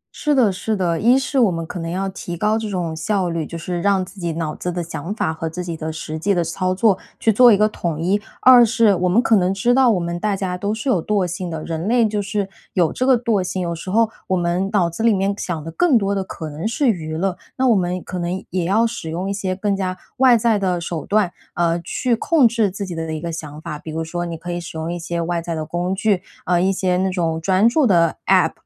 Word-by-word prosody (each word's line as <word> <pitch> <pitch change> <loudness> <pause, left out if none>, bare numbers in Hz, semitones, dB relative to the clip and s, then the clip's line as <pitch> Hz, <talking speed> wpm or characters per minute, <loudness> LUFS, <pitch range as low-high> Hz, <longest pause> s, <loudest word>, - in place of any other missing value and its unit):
是 300 -1 +1
的 235 -6 +4
是 210 +4 -2
的。 175 -4 0
一 240 +4 +5
是 270 +1 0
我 230 -6 +5
们 165 -1 -3
可 175 - -7
能 165 0 -4
要 190 +3 -2
提 175 -2 -6
高 210 +4 +1
这 220 -1 -4
种 175 -4 -3
效 185 0 -1
率， 165 -3 -3
就 170 - -6
是 175 +1 -4
让 195 -1 +2
自 190 +2 -14
己 170 -2 -2
脑 160 -2 -3
子 180 - -4
的 175 0 -3
想 165 +2 -6
法 160 - -1
和 160 0 -4
自 180 +3 -5
己 170 -2 -4
的 160 0 -4
实 155 0 -6
际 200 +3 +1
的 175 - +1
操 185 +3 -1
作 195 -1 +3 0.2
去 225 - +3
做 245 +2 +7
一 205 - +5
个 215 - +4
统 170 -7 -3
一。 195 +5 +1 0.2
二 250 -1 +8
是 230 -2 +4
我 180 -1 0
们 210 +6 +4
可 225 - +4
能 185 -1 +2
知 195 +6 +2
道 260 -1 +5
我 205 -6 +2
们 170 0 -3
大 205 0 0
家 185 -2 -3
都 200 +3 -2
是 220 +6 -4
有 185 -11 +2
惰 205 -1 +1
性 180 +1 -4
的， 160 -1 -5
人 165 +3 -4
类 235 -1 +3
就 210 -1 -1
是 200 0 -2 0.3
有 170 -3 +2
这 255 - -1
个 255 -3 +5
惰 225 -6 +1
性， 185 0 -3
有 170 -1 -2
时 170 +3 -7
候 225 +3 +3 0.2
我 185 - +1
们 175 +3 0
脑 185 -5 +3
子 170 +6 -6
里 225 -2 +4
面 195 +1 0
想 170 -6 -4
的 165 - -6
更 290 - +3
多 200 -1 0
的 195 -1 -1
可 160 -4 -7
能 155 +7 -4
是 265 +4 0
娱 160 -7 -1
乐。 185 +1 -1 0.2
那 260 - +2
我 235 - +5
们 180 -1 -1
可 180 - -5
能 175 +2 -3
也 180 -1 -1
要 215 +6 +3
使 230 -8 -4
用 175 +4 -3
一 200 - -1
些 190 -2 -2
更 200 +1 0
加 185 -1 -3 0.2
外 255 -2 +6
在 220 -2 +2
的 180 -2 0
手 165 -2 -5
段， 205 -4 +2 0.2
呃， 170 0 +1
去 240 +7 0
控 275 +1 +4
制 225 -3 +1
自 200 +2 -5
己 180 - -6
的 160 -1 -4
一 155 - -3
个 170 +1 -4
想 155 -2 -7
法。 155 -2 -6
比 160 - -10
如 160 +1 -3
说 175 +2 -4
你 165 -1 -5
可 175 +2 -6
以 175 - -3
使 165 -1 -8
用 160 +2 -3
一 175 - -4
些 170 +1 -3
外 170 0 -1
在 170 0 -4
的 155 -1 -3
工 175 +4 -2
具， 200 -2 +1 0.2
呃， 175 -1 +2
一 190 +1 +2
些 185 -1 0
那 190 +1 +1
种 165 -3 -1
专 190 +5 +3
注 260 +2 +3
的 170 -4 +3
APP， 185 -4 +4
185 Hz, 300 characters per minute, -20 LUFS, 170-210 Hz, 0.3 s, 二